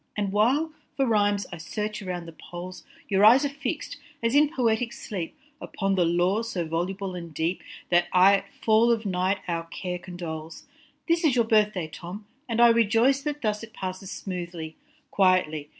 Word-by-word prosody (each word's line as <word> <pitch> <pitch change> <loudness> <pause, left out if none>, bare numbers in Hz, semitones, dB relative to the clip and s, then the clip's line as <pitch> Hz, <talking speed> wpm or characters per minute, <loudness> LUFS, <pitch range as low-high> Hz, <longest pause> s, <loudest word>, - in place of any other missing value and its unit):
And 200 -2 -1
while, 265 +10 +2 0.2
for 270 - +3
rhymes, 205 -4 +2
I - - -5
search 210 +7 -4
around 180 -3 -5
the 165 - -9
poles, 175 +3 -9 0.2
Your 195 0 +2
eyes 245 +7 +7
are - - 0
fix 280 +1 -4
d, - - -7 0.3
as 230 +1 +1
in 290 +1 +5
poetic 235 -2 0
sleep, 185 -7 -6 0.2
Upon 195 -1 -2
the 180 -2 +3
lore 175 +6 +2
so 190 -7 -3
voluble 185 +4 -3
and 170 -2 -7
deep, 165 +5 -1 0.3
That 175 0 +4
aye 190 +2 +6
at - - -10
fall 225 +2 +3
of 225 -2 0
night 190 +1 0
our 165 -1 -2
care 180 +1 -5
condoles. 165 -3 -7 0.4
This 335 0 +2
is 295 -6 +3
your 235 -2 +3
birth 215 -1 +3
day 180 -4 -3
Tom, 180 +6 -9 0.2
and 230 0 -1
I 240 0 +8
rejoice 230 +4 +3
That 295 -1 -4
thus 210 -1 0
it 225 -1 -10
passes 185 -1 -6
smoothly, 175 -5 -6 0.4
quietly. 180 -6 +2
195 Hz, 185 wpm, -26 LUFS, 175-230 Hz, 0.4 s, I